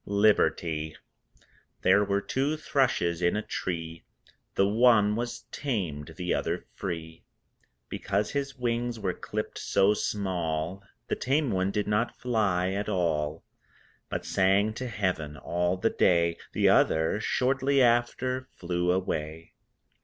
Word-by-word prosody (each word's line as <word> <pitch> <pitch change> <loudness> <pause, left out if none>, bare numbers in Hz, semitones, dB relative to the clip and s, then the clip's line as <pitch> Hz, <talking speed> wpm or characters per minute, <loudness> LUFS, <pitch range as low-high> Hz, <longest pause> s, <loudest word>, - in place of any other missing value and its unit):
LIBERTY 80 -6 +2 0.9
There 100 +2 +5
were 100 0 0
two 140 +8 -1
thrushes 105 - +1
in 85 +2 +2
a 105 - -1
tree, 80 -4 -4 0.5
The 100 - +4
one 105 -1 +4
was 120 +1 -3
tamed, 90 - -3
the 90 -1 -1
other - - -2
free. 80 -3 -6 0.6
Because 100 +1 -1
his 140 -1 -3
wings 120 -1 -1
were 95 -3 -1
clipped - - -5
so 100 +2 +3
small 90 -4 -2 0.3
The - - 0
tame 140 +1 0
one 95 0 +1
did 105 +1 -1
not 105 +3 0
fly 100 -7 +1
at 100 +2 -2
all, 80 -5 -1 0.7
But - - -4
sang 100 +3 +2
to 130 +3 -5
Heaven 90 -9 -2
all 90 +4 -1
the 110 +5 +1
day 85 -1 +2
The - - +3
other 80 +6 +3
(shortly 135 +4 +1
after) 125 +2 +1
flew 90 0 -1
away. 80 -3 -3
100 Hz, 130 wpm, -28 LUFS, 85-115 Hz, 0.9 s, There